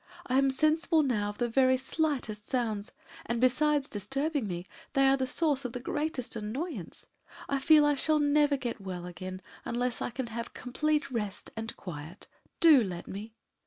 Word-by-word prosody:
I 255 Hz, +1 st, +2 dB
am 275 Hz, 0 st, +4 dB
sensible 310 Hz, +3 st, +3 dB
now 215 Hz, -7 st, 0 dB
of 205 Hz, -, -7 dB
the 240 Hz, -, +1 dB
very 260 Hz, +2 st, +4 dB
slightest 265 Hz, -6 st, -2 dB
sounds, 220 Hz, -5 st, -1 dB, 0.4 s
and 235 Hz, 0 st, -1 dB
besides 290 Hz, +3 st, +3 dB
disturbing 275 Hz, +5 st, -1 dB
me, 175 Hz, -1 st, -4 dB, 0.3 s
they 275 Hz, 0 st, +4 dB
are 270 Hz, 0 st, +5 dB
a 260 Hz, -, 0 dB
source 285 Hz, 0 st, +1 dB
of 245 Hz, -2 st, -4 dB
the 250 Hz, -, -4 dB
greatest 280 Hz, -1 st, -2 dB
annoyance. 225 Hz, -, -5 dB, 0.4 s
I 275 Hz, -, 0 dB
feel 300 Hz, +2 st, +6 dB
I 295 Hz, -, +4 dB
shall 305 Hz, +2 st, +2 dB
never 290 Hz, -1 st, +3 dB
get 240 Hz, -4 st, -4 dB
well 180 Hz, -2 st, -5 dB
again 185 Hz, +1 st, -7 dB, 0.2 s
unless 245 Hz, 0 st, -1 dB
I -, -, -1 dB
can 250 Hz, +2 st, -4 dB
have 235 Hz, 0 st, -5 dB
complete 295 Hz, +3 st, -1 dB
rest 210 Hz, -5 st, -4 dB
and 225 Hz, 0 st, -5 dB
quiet. 165 Hz, +1 st, -8 dB, 0.3 s
Do 305 Hz, -7 st, +7 dB
let 180 Hz, -4 st, -5 dB
me!" 215 Hz, +3 st, -7 dB
255 Hz, 175 wpm, -30 LUFS, 215-290 Hz, 0.4 s, Do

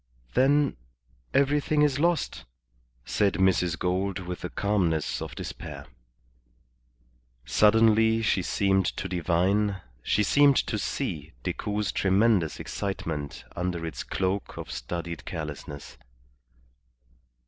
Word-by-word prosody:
"Then 140 Hz, -, +3 dB, 0.5 s
everything 145 Hz, +2 st, +2 dB
is 140 Hz, -2 st, +2 dB
lost," 170 Hz, 0 st, 0 dB, 0.6 s
said 100 Hz, -2 st, +1 dB
Mrs. 90 Hz, -2 st, +2 dB
Gould, 95 Hz, +1 st, -1 dB
with 90 Hz, -1 st, -6 dB
the 90 Hz, -, -4 dB
calmness 90 Hz, -7 st, 0 dB
of -, -, -6 dB
despair. -, -, -7 dB, 1.6 s
Suddenly 110 Hz, -, +4 dB
she 100 Hz, -, +2 dB
seemed 95 Hz, 0 st, +1 dB
to -, -, -3 dB
divine, 95 Hz, +3 st, +1 dB, 0.2 s
she 105 Hz, -, +1 dB
seemed 140 Hz, +5 st, +5 dB
to -, -, -2 dB
see -, -, -3 dB
Decoud's 105 Hz, -1 st, -2 dB
tremendous 95 Hz, -3 st, +2 dB
excitement 85 Hz, -8 st, -4 dB
under 90 Hz, -1 st, -2 dB
its 80 Hz, -, -5 dB
cloak 95 Hz, +1 st, -2 dB
of -, -, -6 dB
studied 85 Hz, +6 st, -5 dB
carelessness. 75 Hz, -2 st, -7 dB
95 Hz, 105 wpm, -27 LUFS, 85-110 Hz, 1.6 s, seemed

